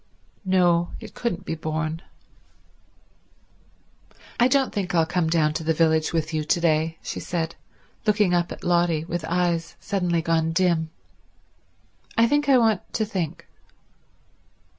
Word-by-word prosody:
—no, 175 -3 +3
it - - -11
couldn't 235 -8 -3
be - - -3
borne. 155 0 -3 2.4
"I 240 - +6
don't 270 0 +2
think 190 -3 -2
I'll 165 -1 +4
come 175 -1 0
down 155 -2 +2
to 160 - -3
the 160 0 +1
village 160 -1 +2
with 160 -1 -2
you 155 -1 0
to 155 - +1
day," 160 -1 +1
she - - -5
said, 165 -2 -3 0.5
looking 210 -3 +3
up 175 -1 +1
at - - -8
Lotty 170 -2 +1
with 175 -1 -4
eyes 170 0 -1
suddenly 175 -4 -1
gone 165 -1 +1
dim. 170 -2 +1 1.3
"I 230 - +6
think 290 +4 +1
I 265 - +7
want 225 -3 +3
to 220 - 0
think." 185 -7 -4
170 Hz, 140 wpm, -24 LUFS, 160-185 Hz, 2.4 s, I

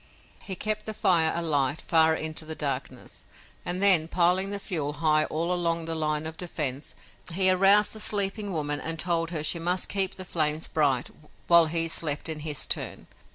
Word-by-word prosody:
He 190 - -6
kept 215 +3 -3
the 215 - -6
fire 165 -5 +3
alight 150 -4 0
far 160 -1 +3
into 155 0 -4
the 160 0 -7
darkness, 130 -4 -5 0.4
and 180 +2 -2
then, 180 -6 +6
piling 180 +3 +1
the 200 - -4
fuel 155 -7 -4
high 155 -1 +1
all 170 +3 -2
along 170 -2 -1
the 165 - -4
line 155 -1 -2
of 160 0 -6
defense, 150 -6 -4 0.4
he 185 +2 +4
aroused 195 +3 +3
the 220 - -8
sleeping 205 0 +1
woman 145 -3 -2
and 165 +2 -2
told 165 0 -1
her 160 -3 -4
she 170 +2 +2
must 180 +2 -1
keep 195 -1 +1
the 185 - -9
flames 155 -2 -2
bright 140 -5 -1 0.3
while 170 -1 +5
he 165 +1 +1
slept 155 -1 -1
in 155 -1 -4
his 150 -2 -2
turn. - - -4
165 Hz, 185 wpm, -26 LUFS, 155-185 Hz, 0.4 s, then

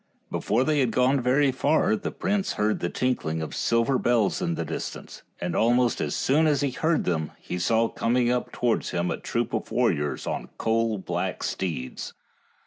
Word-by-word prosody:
Before 115 +4 +1
they 150 +1 +1
had 130 -3 +3
gone 125 +3 +2
very 135 +3 +3
far 140 -3 +2
the - - -4
prince 195 +1 -1
heard 105 +1 0
the 85 - -1
tinkling 105 -12 -1
of 80 - -5
silver 115 +3 +1
bells 120 - +2
in 170 -2 0
the - - -3
distance, - - -6 0.2
and 90 0 -3
almost 120 +1 +3
as - - -1
soon 155 +4 +3
as 145 -2 +2
he 140 -2 0
heard 160 +5 +1
them 80 -3 -1
he 90 - -5
saw 115 +5 +2
coming 120 +2 +1
up 125 0 -1
towards 120 -2 0
him 85 0 -1
a - - -2
troop - - -2
of - - -2
warriors 75 0 0
on - - -4
coal 115 -1 +1
black 95 - -3
steeds. 80 -9 -4
120 Hz, 185 wpm, -26 LUFS, 105-135 Hz, 0.2 s, had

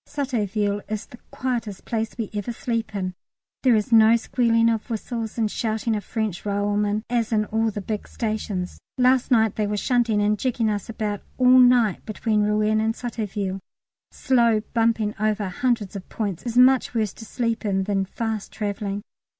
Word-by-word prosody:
Sotteville 210 -7 -1
is 215 -1 -3
the 245 - -14
quietest 235 -6 -3
place 225 -1 -3
we 225 -4 -4
ever 205 +2 -3
sleep 230 -2 -3
in; 185 -2 -2 0.5
there 255 -3 +4
is 215 +1 0
no 225 0 +7
squealing 230 -1 +2
of 225 0 0
whistles 225 0 -4
and 220 -2 0
shouting 220 0 -1
of 210 - -3
French 215 -3 -3
railwaymen 205 +1 0
as 235 -2 0
in 215 -1 +2
all 225 +1 0
the 205 -1 -5
big 210 +1 -4
stations. 215 -5 -3 0.2
Last 255 0 +3
night 220 -4 +3
they 210 -1 +1
were 210 0 -1
shunting 235 -2 +1
and 205 0 +1
jigging 235 -4 0
us 205 0 -4
about 210 -2 -3 0.2
all 255 0 +6
night 245 -5 +4
between 215 0 0
Rouen 210 +1 +2
and 225 +1 0
Sotteville. 210 -5 -3 0.5
Slow 235 -4 +2
bumping 225 -2 +1
over 215 -1 0
hundreds 225 0 -1
of 195 - -7
points 200 -6 -3
is 235 0 -2
much 255 0 +5
worse 215 -3 0
to - - -11
sleep 230 +1 -2
in 195 -2 0
than 195 -1 0
fast 220 +1 -4
travelling. 205 -1 -3
220 Hz, 175 wpm, -24 LUFS, 205-230 Hz, 0.5 s, no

